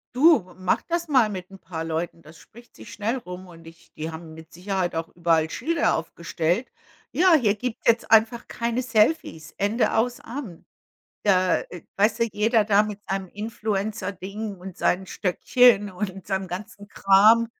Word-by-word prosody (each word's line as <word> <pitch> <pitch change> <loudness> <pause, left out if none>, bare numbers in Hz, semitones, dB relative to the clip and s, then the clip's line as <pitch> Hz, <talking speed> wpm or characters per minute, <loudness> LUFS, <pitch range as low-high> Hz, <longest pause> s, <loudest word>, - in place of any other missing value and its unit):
Du, 255 - +4
mach 185 -1 0
das 340 -1 -3
mal 260 -6 +4
mit 185 -2 -7
'n 195 - -12
paar 165 -4 -6
Leuten. 165 +1 -4
Das 160 0 -15
spricht 235 +2 -17
sich - - -11
schnell 225 +5 -2
rum 185 -5 -9
und 165 -2 -14
ich 165 +1 -16
die 160 +1 -5
haben 160 0 -9
mit 160 +1 -14
Sicherheit 180 -1 -2
auch 165 0 -3
überall 165 -2 +1
Schilder 330 - 0
aufgestellt. 170 +5 -2 0.4
„Ja, 365 +1 +4
hier 240 -10 +4
gibt's 240 +2 -5
jetzt 230 0 +2
einfach 225 +2 +3
keine 235 +1 -2
Selfies, 220 - 0
Ende, 210 +4 +1
aus, 240 +2 0
an.“ 235 - -8 0.6
Da 185 -3 +3
äh, 175 - -10 0.2
weißt 210 +2 +3
du, 230 - +3
jeder 215 +2 +2
da 205 0 +4
mit 210 -1 -5
seinem 195 -1 -2
Influencer-Ding 205 -1 -4
und 185 0 -10
seinen 190 +1 0
Stöckchen 205 +3 +3
und 190 0 -5
seinem 190 -1 -2
ganzen 205 +2 -8
Kram, 210 +5 +5
200 Hz, 165 wpm, -24 LUFS, 180-230 Hz, 0.6 s, Kram